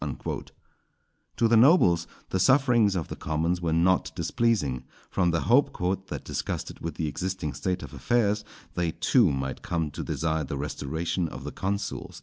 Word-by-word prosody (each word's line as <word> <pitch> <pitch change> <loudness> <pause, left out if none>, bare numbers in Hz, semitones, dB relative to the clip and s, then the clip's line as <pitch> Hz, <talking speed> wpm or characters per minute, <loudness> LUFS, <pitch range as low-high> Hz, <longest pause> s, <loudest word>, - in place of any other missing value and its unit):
_" - - -4 0.9
To 115 - +4
the 115 - +4
nobles 110 - +5 0.2
the 95 - +1
sufferings 120 -4 +4
of 85 -4 -2
the - - -6
commons 80 +3 -1
were 85 -2 0
not 90 +3 +2
displeasing, 100 - 0 0.3
from 90 -2 +2
the 85 -1 +1
hope 130 +5 +3
"_that 95 +2 -2
disgusted - - -4
with 85 -2 -5
the 80 - -2
existing 90 -1 -3
state 90 -1 -2
of - - -9
affairs, 105 -3 +1 0.3
they 85 -2 -1
too 95 - +3
might 65 -1 -3
come 80 -3 -2
to - - -5
desire 80 -1 -1
the 70 0 -4
restoration 80 +5 -2
of 65 - -8
the 75 - -5
consuls. 100 +1 -4
90 Hz, 165 wpm, -27 LUFS, 80-105 Hz, 0.9 s, nobles